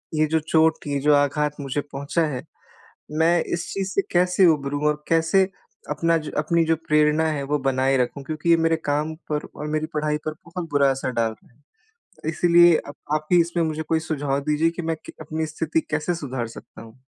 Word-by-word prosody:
ये 155 0 +3
जो 160 +1 +1
चोट 160 -1 +2
ये 140 -1 -1
जो 150 +1 +4
आघात 145 +1 +1
मुझे 140 +1 -2
पहुँचा 145 +3 -2
है 125 - -5 0.8
मैं 170 +1 +4
इस 170 0 -2
चीज़ 195 -1 -2
से 200 - +2
कैसे 180 +1 +4
उभरूँ 145 -2 0
और 150 0 -1
कैसे 165 +4 +4 0.5
अपना 165 +3 +2
ज 155 -1 -7
अपनी 165 +2 +2
जो 165 0 +2
प्रेरणा 150 +1 +3
है 145 -2 -2
वो 150 - +3
बनाए 135 0 +2
रखूँ 130 +2 -1
क्योंकि 155 +3 -3
ये 165 - +6
मेरे 165 0 +2
काम 150 +2 0 0.2
पर 150 0 -2
और 150 - -5
मेरी 155 0 0
पढ़ाई 150 0 0
पर 155 - -2
बहुत 170 0 -6
बुरा 140 -1 +4
असर 135 -1 -2
डाल 115 -1 +1
रहा 110 +3 -18
है 145 +4 -36 0.5
इसीलिए 175 0 +5
अब 145 - -9 0.2
आप 155 0 -3
ही 175 - +7
इसमें 170 0 -1
मुझे 160 0 -2
कोई 160 +1 0
सुझाव 145 -3 -2
दीजिए 155 +2 +3
कि - - -2
मैं 165 0 -1
कै - - -10
अपनी 155 +1 -3
स्थिति 160 +1 -1
कैसे 155 +4 0
सुधार 130 -7 -4
सकता 115 - -12
हूँ। 115 +2 -14
155 Hz, 205 wpm, -23 LUFS, 145-165 Hz, 0.8 s, ही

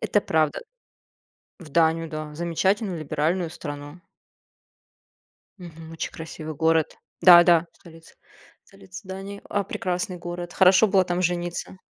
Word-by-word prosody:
Это 205 - +1
правда. 155 -5 0 1.0
В 165 -4 -13
Данию 165 +1 +1
да, 155 -1 -7
замечательную 180 +3 -1
либеральную 155 +3 -1
страну. 145 +1 -8 1.6
Мгм. 165 -3 -11
Очень 165 - -5
красивый 160 -1 -8
город. 160 +1 +1 0.2
Да-да, 175 -2 +7
столица. 165 -1 -17 0.5
Столица 95 - -13
Дании. 195 +1 -8
А, 205 -1 0
прекрасный 180 0 -3
город, 175 0 -7
хорошо 190 +3 +5
было 190 -1 +3
там 175 +1 -1
жениться. 175 +1 -3
170 Hz, 115 wpm, -24 LUFS, 160-185 Hz, 1.6 s, Да-да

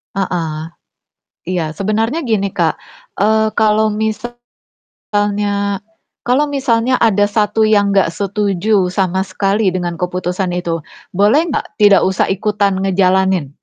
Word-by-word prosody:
Heeh, 165 -5 -3 0.8
iya 180 -2 0
sebenarnya 220 - -1
gini 200 -3 +1
Kak, - - +1 0.4
eee, 220 +1 +2
kalau 215 0 +3
misalnya 220 +3 -4 1.7
kalau 255 +4 +3
misalnya 255 -3 +1
ada 205 -3 +3
1 220 +1 +2
yang 205 -2 +3
nggak 195 -4 +3
setuju 200 -1 0
sama 190 0 0
sekali 200 +1 0
dengan 175 -2 -2
keputusan 180 +1 -2
itu, 165 -2 -3 0.3
boleh 205 - +4
nggak 290 - -2
tidak 205 -1 +6
usah 190 - 0
ikutan 205 0 0
ngejalanin? 190 -5 +1
200 Hz, 115 wpm, -16 LUFS, 185-220 Hz, 1.7 s, tidak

